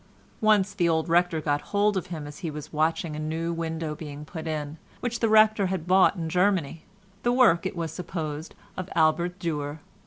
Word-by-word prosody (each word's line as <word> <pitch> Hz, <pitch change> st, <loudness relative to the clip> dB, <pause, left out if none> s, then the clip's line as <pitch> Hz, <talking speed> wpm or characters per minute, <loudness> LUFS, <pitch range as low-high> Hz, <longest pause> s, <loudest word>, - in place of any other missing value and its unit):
Once 210 Hz, -2 st, +3 dB
the 175 Hz, -4 st, +1 dB
old 160 Hz, 0 st, +1 dB
rector 175 Hz, -1 st, +2 dB
got 145 Hz, -1 st, 0 dB
hold 205 Hz, 0 st, +1 dB
of 190 Hz, -, -2 dB
him 160 Hz, -4 st, -6 dB
as 145 Hz, 0 st, -9 dB
he 165 Hz, -, -3 dB
was 150 Hz, 0 st, -8 dB
watching 155 Hz, +1 st, 0 dB
a -, -, -5 dB
new 160 Hz, +2 st, -2 dB
window 160 Hz, -1 st, -3 dB
being 150 Hz, -1 st, -8 dB
put 160 Hz, +1 st, -7 dB
in, 155 Hz, 0 st, -4 dB, 0.2 s
which 240 Hz, -1 st, -3 dB
the 225 Hz, -, +2 dB
rector 215 Hz, -2 st, +5 dB
had 185 Hz, -3 st, -3 dB
bought 185 Hz, +2 st, +5 dB
in 165 Hz, -3 st, -3 dB
Germany—the 190 Hz, +4 st, -1 dB
work, 220 Hz, -9 st, +4 dB
it -, -, -6 dB
was 165 Hz, -2 st, -3 dB
supposed, 160 Hz, -3 st, -5 dB, 0.2 s
of 185 Hz, -, -5 dB
Albert 170 Hz, +3 st, +2 dB
Dürer. 150 Hz, -5 st, -3 dB
165 Hz, 190 wpm, -26 LUFS, 155-190 Hz, 0.2 s, rector